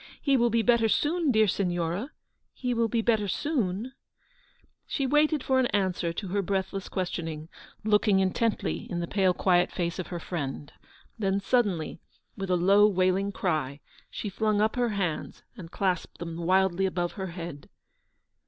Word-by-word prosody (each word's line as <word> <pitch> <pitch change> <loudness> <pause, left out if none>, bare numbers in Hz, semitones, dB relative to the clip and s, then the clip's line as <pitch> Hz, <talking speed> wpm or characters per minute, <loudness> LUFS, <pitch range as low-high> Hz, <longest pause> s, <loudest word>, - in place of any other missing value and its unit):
He 275 -2 +2
will 240 -2 +3
be 230 0 +2
better 235 -2 +4
soon, 320 +6 +1
dear 220 -2 +4
Signora; 175 - -1 0.4
he 250 -1 -2
will 230 -1 +2
be 225 0 0
better 220 -3 +2
soon 230 - -1 0.5
?" - - -37
She 275 - -1
waited 300 +1 +2
for 260 -1 +2
an 255 - +3
answer 185 -5 0
to 185 +3 -5
her 200 +2 0
breathless 195 0 -2
questioning, 165 -4 -4 0.3
looking 210 -2 +3
intently 195 +4 -1
in 175 - -2
the 170 - -1
pale 190 +1 +2
quiet 180 -1 +3
face 170 0 -2
of 180 - -4
her 175 - -5
friend; 145 -4 -5 0.5
then 195 -1 +1
suddenly, 195 -9 0 0.4
with 195 -1 -5
a 180 - +3
low, 200 +4 +5
wailing 190 0 +1
cry, 155 -8 -2 0.3
she - - -5
flung 210 +1 0
up 215 +1 +2
her 245 -1 +1
hands 195 -7 -3
and 165 -3 -9
clasped 185 -1 -2
them 165 -1 -6
wildly 190 +2 +2
above 175 -2 -2
her 190 -2 -5
head. 170 -4 -8
195 Hz, 165 wpm, -27 LUFS, 175-220 Hz, 0.5 s, low